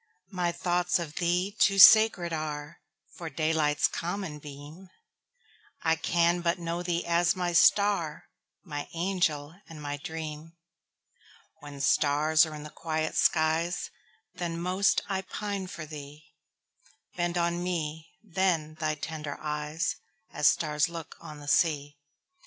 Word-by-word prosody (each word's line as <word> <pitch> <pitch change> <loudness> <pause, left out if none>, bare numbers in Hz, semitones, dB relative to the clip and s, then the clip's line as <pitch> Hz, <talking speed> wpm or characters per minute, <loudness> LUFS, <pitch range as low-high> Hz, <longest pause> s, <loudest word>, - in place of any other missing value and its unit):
My 180 -2 0
thoughts 175 0 0
of 160 -3 -6
thee 180 +3 0
too 195 -1 +4
sacred 200 -4 +8
areFor 155 +1 -7
daylight's 155 -2 +2
common 175 -3 -4
beam:I 165 - -7
can 170 +2 +1
but 170 +1 +1
know 170 0 -3
thee 175 -1 -2
as 170 0 +2
my 175 -1 -1
star, 170 -3 +3 0.4
My 145 -5 -5
angel 165 -4 -1 0.2
and 160 -2 -10
my 145 -1 -4
dream; 160 +1 -7 1.1
When 145 -2 -10
stars 150 +3 +3
are 155 - -7
in 150 - -8
the 150 - -9
quiet 155 -1 -3
skies, 160 +2 +1 0.4
Then 170 -1 -4
most 185 +3 +2
I 195 -2 -1
pine 200 0 -4
for 170 -3 -7
thee; 150 0 -11 0.8
Bend 175 0 -1
on 170 0 0
me 160 -3 -3
then 170 -6 0
thy 155 -1 0
tender 155 -1 -6
eyes, 150 +2 -2 0.3
As 150 - +2
stars 150 -1 +2
look 165 -2 -8
on 150 -1 -10
the 145 - -11
sea! 145 -1 +1
165 Hz, 130 wpm, -28 LUFS, 150-175 Hz, 1.1 s, sacred